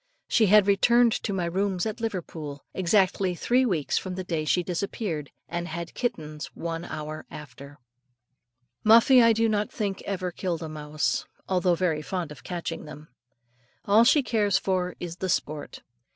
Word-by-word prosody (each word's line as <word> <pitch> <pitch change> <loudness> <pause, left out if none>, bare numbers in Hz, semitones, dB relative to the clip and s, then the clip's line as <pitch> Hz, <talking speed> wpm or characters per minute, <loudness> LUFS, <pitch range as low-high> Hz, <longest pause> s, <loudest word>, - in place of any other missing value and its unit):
She 220 -3 +3
had 210 0 +6
returned 235 +4 +4
to 215 - -2
my 185 -3 -1
rooms 190 +2 -1
at 220 +1 -4
Liverpool, 160 -9 -5
exactly 190 0 +2
three 250 +8 +2
weeks 165 -9 0
from 185 -1 -6
the 185 - -4
day 165 -4 -2
she 180 +3 +2
disappeared, 175 -4 -3 0.2
and 175 0 -4
had 170 +1 -6
kittens 155 -11 -3
one 165 0 -4
hour 155 -1 -6
after. 140 0 -11 1.1
Muffie 235 +4 +7
I 230 0 +6
do 225 +1 +2
not 210 -1 0
think 200 -3 -3
ever 185 -2 -2
killed 170 -2 -3
a 160 - -5
mouse, 150 0 -2 0.2
although 180 -1 +2
very 160 -3 0
fond 170 0 -4
of 150 - -11
catching 175 -3 -5
them. 150 0 -11 0.8
All 210 +3 +6
she 275 +4 +5
cares 210 -5 +2
for 185 -2 -1
is 175 -1 -6
the 190 0 -3
sport. 155 -3 -3
180 Hz, 165 wpm, -26 LUFS, 160-205 Hz, 1.1 s, Muffie